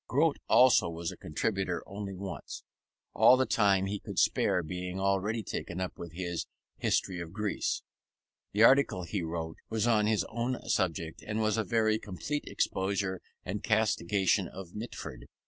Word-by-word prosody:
Grote 150 +3 +2
also 125 -8 +6
was 85 0 -4
a - - -9
contributor 90 +1 -2
only 100 0 -6
once; 90 -6 -7 0.5
all 130 - +7
the 130 - +2
time 100 -4 +3
he 100 +1 -3
could - - -8
spare 90 - +3
being 90 +3 -4
already 100 +3 0
taken 90 -1 -4
up 95 -1 -4
with 85 -2 -7
his 85 -1 -3 0.3
History 90 -3 0
of 85 -1 -6
Greece. 105 0 -1 0.7
The 105 +2 +3
article 130 -7 +5
he 95 +2 -3
wrote 80 0 -4
was 110 -1 0
on 110 -3 +3
his 105 -4 +2
own 120 +2 -2
subject, 80 -3 -1
and 105 +1 -1
was 110 -1 +2
a 110 - +1
very 110 -1 +2
complete 115 +9 -4
exposure 95 -1 -1 0.2
and 100 +3 -3
castigation 100 -3 +2
of 90 -1 -9
Mitford. 115 +3 -7
100 Hz, 160 wpm, -30 LUFS, 90-110 Hz, 0.7 s, all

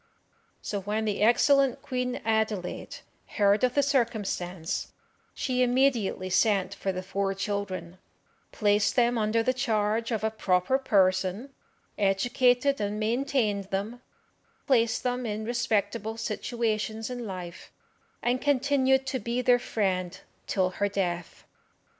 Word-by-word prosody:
So 200 -2 -3
when 210 +3 -2
the 205 -2 -1
excellent 270 +4 +4
Queen 250 -1 -2
Adelaide 220 -4 -1 0.4
heard 205 +1 +3
of 250 -1 +2
the 285 - +4
circumstance, 205 - -1 0.4
she 255 -2 -1
immediately 245 -7 +2
sent 195 0 +2
for 195 - -2
the 185 0 -5
four 195 +1 -2
children, 190 -3 -4 0.5
placed 205 -1 +2
them 245 -1 +3
under 220 +1 +1
the 255 - +1
charge 225 -3 0
of 220 -3 -2
a 220 - +1
proper 195 +4 +1
person, 195 +1 +1 0.5
educated 245 +6 +2
and 205 +1 -2
maintained 220 -3 0
them, 205 +5 -4 0.6
placed 230 -4 +2
them 250 -1 -1
in 215 0 -3
respectable 220 -2 -1
situations 220 0 -2
in 245 -2 -5
life, 180 -2 -8 0.5
and 250 +1 +1
continued 270 -1 +2
to 260 0 -2
be 235 +3 -2
their 245 0 +5
friend 185 -6 -2 0.3
till 185 -2 +1
her 205 +2 -1
death. 175 -3 -3
220 Hz, 125 wpm, -27 LUFS, 195-245 Hz, 0.6 s, their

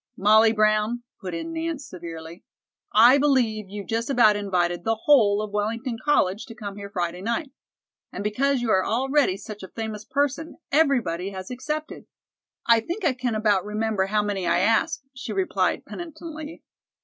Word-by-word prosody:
"Molly 215 +3 +5
Brown," 215 +2 +1 0.2
put 185 -4 -5
in 330 - -5
Nance 325 -3 -3
severely, 165 -1 -9 0.5
"I 240 +6 +7
believe 235 -8 +1
you've 200 0 -7
just 230 +2 -2
about 235 -6 +5
invited 175 -4 -1
the 225 +1 -1
whole 215 -8 +5
of 210 - -6
Wellington 230 +3 -2
College 220 -7 +1
to 230 - -10
come 205 -3 -7
here 200 0 -8
Friday 180 -2 -3
night. 265 - -2 0.6
And - - -5
because 255 +6 +1
you 235 -2 0
are 190 -2 +3
already 265 -2 +1
such 210 0 -9
a 190 - -8
famous 220 0 -6
person, 285 +5 -2
everybody 245 - +2
has 190 +1 -8
accepted." 300 +5 -5 0.6
"I 230 -1 +5
think 345 - -4
I 285 - +3
can 250 -3 -2
about 210 -3 +2
remember 210 -2 -1
how 210 +1 +1
many 195 -3 -2
I 170 0 +3
asked," 225 - +1
she 255 - -6
replied 380 -1 0
penitently. 325 -2 -8
220 Hz, 165 wpm, -24 LUFS, 200-270 Hz, 0.6 s, I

